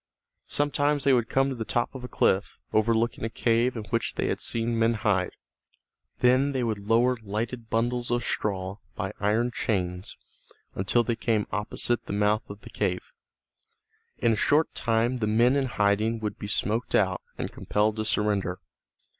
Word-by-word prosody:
Sometimes 145 0 +1
they 140 - +4
would 120 -2 +2
come 135 +1 +2
to - - -2
the 115 - -3
top 120 +2 -1
of 130 -2 -8
a - - -5
cliff, 95 -4 +1 0.2
overlooking 115 +2 +1
a 115 - -1
cave 120 +2 +1
in 110 - -4
which 115 -1 0
they - - -1
had - - -1
seen 115 0 -1
men 115 +1 +3
hide. 100 -4 0 0.9
Then 130 +3 +4
they 130 -2 0
would 110 -3 -1
lower 120 +2 +4
lighted 110 +3 -4
bundles 120 +2 0
of 120 0 0
straw 95 -1 -2 0.2
by 95 +2 -3
iron 110 +4 +1
chains 90 -5 -2 0.6
until 100 +6 +1
they 115 0 -1
came 110 -2 0
opposite 105 +3 0
the - - -3
mouth 105 +1 +1
of 100 +1 -9
the - - -12
cave. 485 - -2 1.1
In 115 - +2
a - - +1
short 150 +8 +2
time 115 +2 +1
the 110 -3 -1
men 120 +5 +4
in 135 -2 +1
hiding 105 0 +1
would 105 -1 -4
be 105 - -5
smoked 110 +3 0
out, 95 -2 +2 0.2
and - - -4
compelled 105 +1 0
to 110 - -1
surrender. 105 -4 0
115 Hz, 175 wpm, -27 LUFS, 105-120 Hz, 1.1 s, they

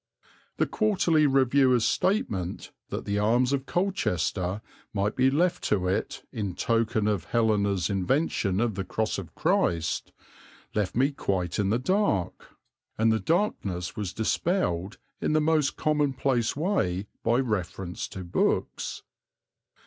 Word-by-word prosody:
The - - +3
Quarterly 175 -8 +2
Reviewer's 130 -3 +4
statement 110 - -1 0.2
that - - -4
the 100 0 0
arms 120 +5 +2
of 135 -1 -2
Colchester 105 - -1 0.3
might 100 +1 0
be 130 +1 +4
left 175 +5 +1
to 95 -3 +1
it 95 - -2
"in 100 -5 -3
token 115 -1 +1
of 100 -6 0
Helena's 100 -4 +1
invention 100 - 0
of 115 -1 +1
the 95 0 -3
cross 110 +1 -2
of 90 - -10
Christ," 85 -1 0 0.6
left 100 -5 -1
me 135 +4 +3
quite 95 - -2
in 100 -1 +1
the 110 - +2
dark; 130 - -1 0.4
and 110 +1 +3
the 110 - +2
darkness 95 - -1
was 100 -4 -3
dispelled 110 - -1 0.2
in - - +1
the 155 - +4
most 155 -2 +2
commonplace 135 -5 +1
way 140 - 0 0.2
by 115 +1 +2
reference 95 -7 -2
to 95 - -7
books. 85 - -1
110 Hz, 135 wpm, -27 LUFS, 95-140 Hz, 0.6 s, Reviewer's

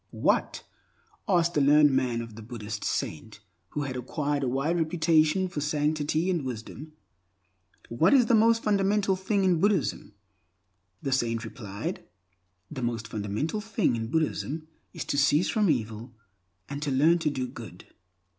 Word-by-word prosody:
"What," - - 0 0.6
asked 170 -3 +2
the 150 - +2
learned 145 +1 +6
man 125 -3 0
of 115 -1 -10
the 115 - -9
Buddhist 110 -2 -6
saint 105 +7 -3 0.3
who 150 - -3
had 135 -2 -4
acquired 145 +3 -2
a 135 - 0
wide 135 +7 0
reputation 160 +1 +2
for 155 -5 -5
sanctity 150 +2 0
and 175 -5 0
wisdom—"what 110 - -5
is 260 -4 +6
the 230 - +1
most 230 +1 +4
fundamental 200 -1 +2
thing 195 +1 0
in 180 -3 +3
Buddhism?" 195 - 0 0.9
The 135 - -2
saint 115 -3 0
replied, 105 -3 -6 0.7
"The 135 -4 -5
most 115 -2 -2
fundamental 110 - -3
thing 210 - 0
in 115 -1 -3
Buddhism 155 +1 -2 0.2
is - - -6
to 140 - 0
cease 150 +4 +3
from 210 -4 +2
evil 115 -3 -2 0.5
and 140 +1 -6
to 150 - -2
learn 155 +6 +4
to 160 - 0
do 130 -3 -3
good." 120 -6 -11
145 Hz, 150 wpm, -27 LUFS, 115-170 Hz, 0.9 s, learned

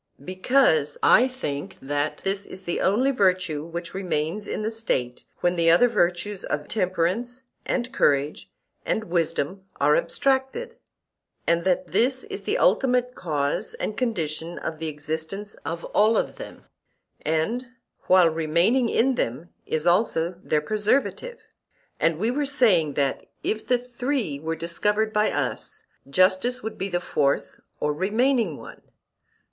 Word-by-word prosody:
Because 185 - +2
I 250 - +6
think 150 - -5
that 145 +2 -2
this 195 +1 -1
is 190 - -9
the 175 - -2
only 245 +8 +3
virtue 185 - +1
which 170 +1 -6
remains 185 +1 -2
in - - -3
the 220 - -1
State 125 - -2 0.2
when 175 0 +2
the 165 -1 +3
other 175 +9 +6
virtues 190 -2 0
of 145 0 -3
temperance 205 +6 -1 0.2
and 250 -1 -1
courage 145 +1 +1 0.3
and 220 - -1
wisdom 170 0 -1 0.2
are 150 +1 +4
abstracted; 275 - 0 0.7
and, 170 +1 +1
that 185 -1 +1
this 255 - +2
is - - -6
the - - +1
ultimate 250 +4 +2
cause 150 - -2
and 215 - -3
condition 170 - -2
of 160 -1 -5
the 160 - -3
existence 160 +7 -4
of 165 +1 -4
all 220 +2 +4
of - - -1
them, - - -10 0.6
and 185 +12 -1 0.4
while 185 -2 +6
remaining 170 +10 +2
in 260 +5 +3
them 155 - -3 0.2
is 155 0 -1
also 175 -2 +1
their 150 - +1
preservative; 215 - 0 0.6
and 165 -1 +2
we 220 +7 0
were 290 +3 0
saying 185 - +3
that 140 -2 -1 0.2
if 220 - -2
the 250 - +4
three 245 - -3
were 160 +2 -3
discovered 210 +7 0
by 210 0 +2
us, 435 +1 -3 0.3
justice 185 - +3
would 220 - -6
be 195 - -2
the 175 -1 0
fourth 140 -5 -1 0.2
or 150 0 0
remaining 215 - +1
one. - - -12
185 Hz, 145 wpm, -25 LUFS, 160-235 Hz, 0.7 s, I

